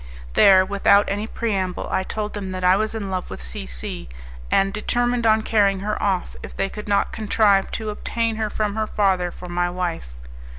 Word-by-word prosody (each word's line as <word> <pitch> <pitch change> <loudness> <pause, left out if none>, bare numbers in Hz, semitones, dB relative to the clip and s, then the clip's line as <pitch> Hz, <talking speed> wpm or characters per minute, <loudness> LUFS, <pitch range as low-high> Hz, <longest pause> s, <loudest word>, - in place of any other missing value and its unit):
There, 185 - +6
without 200 +1 +4
any 205 +2 -2
preamble, 195 -6 -2
I - - +1
told 210 +2 -4
them 200 -2 -5
that 185 0 -5
I 180 +1 +5
was 215 +2 -1
in 200 -3 -4
love 185 -1 -3
with - - -7
C 60 +1 -6
C, - - -6 0.4
and 195 0 +2
determined 240 +2 0
on 220 0 +4
carrying 200 -4 +2
her 210 +1 -2
off 190 -3 -1
if - - -10
they 195 - 0
could 210 +1 -8
not 200 -1 +1
contrive 210 -2 +2
to 220 -1 -3
obtain 230 +1 -2
her 220 -1 -1
from 210 -1 -1
her 220 -1 -1
father 190 -4 +1
for 180 +1 -10
my 175 0 0
wife. 175 - -3
200 Hz, 200 wpm, -22 LUFS, 185-215 Hz, 0.4 s, There